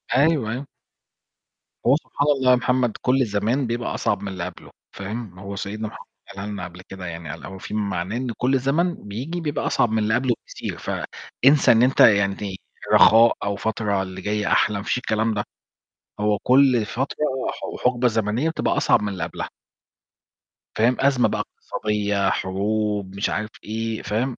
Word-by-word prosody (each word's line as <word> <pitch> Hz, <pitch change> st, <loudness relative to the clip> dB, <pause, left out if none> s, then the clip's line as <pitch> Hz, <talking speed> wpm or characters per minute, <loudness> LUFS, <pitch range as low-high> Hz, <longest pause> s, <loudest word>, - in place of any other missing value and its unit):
أيوة، 140 Hz, +4 st, +5 dB, 0.2 s
أيوة. 130 Hz, +4 st, -5 dB, 1.2 s
هو 130 Hz, -, +6 dB
سبحان 145 Hz, -1 st, -2 dB
الله 130 Hz, -1 st, +4 dB
يا -, -, +7 dB
محمد 125 Hz, -2 st, +1 dB
كل 130 Hz, +1 st, +3 dB
زمان 110 Hz, +5 st, 0 dB
بيبقى 120 Hz, +1 st, -2 dB
أصعب -, -, 0 dB
من 100 Hz, -, -5 dB
اللي 95 Hz, -3 st, -4 dB
قبله، -, -, -10 dB, 0.2 s
فاهم، 100 Hz, 0 st, -6 dB
ما 95 Hz, -, -12 dB
هو 100 Hz, 0 st, -6 dB
سيدنا 105 Hz, +2 st, -4 dB
محمد -, -, -11 dB, 0.2 s
قالها 100 Hz, 0 st, -7 dB
لنا 100 Hz, -3 st, -5 dB
قبل 90 Hz, 0 st, -9 dB
كدة 95 Hz, 0 st, -9 dB
يعني، 85 Hz, -2 st, -6 dB
قال -, -, -7 dB
أو 95 Hz, -, -8 dB
في 95 Hz, -, -8 dB
معناه 100 Hz, -1 st, -2 dB
إن 130 Hz, +1 st, -3 dB
كل 130 Hz, +1 st, +2 dB
زمن 160 Hz, +7 st, +1 dB
بييجي 135 Hz, +13 st, -4 dB
بيبقى 150 Hz, -2 st, -2 dB
أصعب 120 Hz, -3 st, +2 dB
من 110 Hz, -, +1 dB
اللي 110 Hz, 0 st, +1 dB
قبله 125 Hz, 0 st, +2 dB
بكتير. -, -, -6 dB
فإنسى 140 Hz, +2 st, +2 dB
إن 115 Hz, 0 st, +5 dB
أنت 130 Hz, +2 st, +2 dB
يعني 100 Hz, -2 st, +4 dB, 0.4 s
رخاء 115 Hz, +1 st, +7 dB
أو 100 Hz, 0 st, -1 dB
فترة 105 Hz, -2 st, -1 dB
اللي 95 Hz, 0 st, -8 dB
جاية 105 Hz, +1 st, -1 dB
أحلى، 105 Hz, -1 st, +3 dB
مفيش 100 Hz, -, -1 dB
الكلام 110 Hz, -2 st, 0 dB
ده. 105 Hz, -1 st, -1 dB, 0.8 s
هو 105 Hz, 0 st, +2 dB
كل 130 Hz, -3 st, +5 dB
فترة 130 Hz, +6 st, -3 dB, 0.3 s
وح -, -, -5 dB
وحقبة 125 Hz, 0 st, +1 dB
زمنية 115 Hz, +6 st, 0 dB
بتبقى 160 Hz, -, -1 dB
أصعب -, -, +3 dB
من 105 Hz, -, -1 dB
اللي 90 Hz, -4 st, -4 dB
قبلها. 80 Hz, -, -5 dB, 1.3 s
فاهم، 120 Hz, +3 st, +4 dB
أزمة 135 Hz, -2 st, +3 dB
بقى -, -, -2 dB
اقتصادية، 105 Hz, -2 st, -1 dB
حروب، 100 Hz, +1 st, -1 dB
مش 100 Hz, -, 0 dB
عارف 110 Hz, +2 st, -2 dB
إيه، 110 Hz, +1 st, -3 dB
فاهم، 120 Hz, +4 st, -2 dB
110 Hz, 175 wpm, -23 LUFS, 100-125 Hz, 1.3 s, يا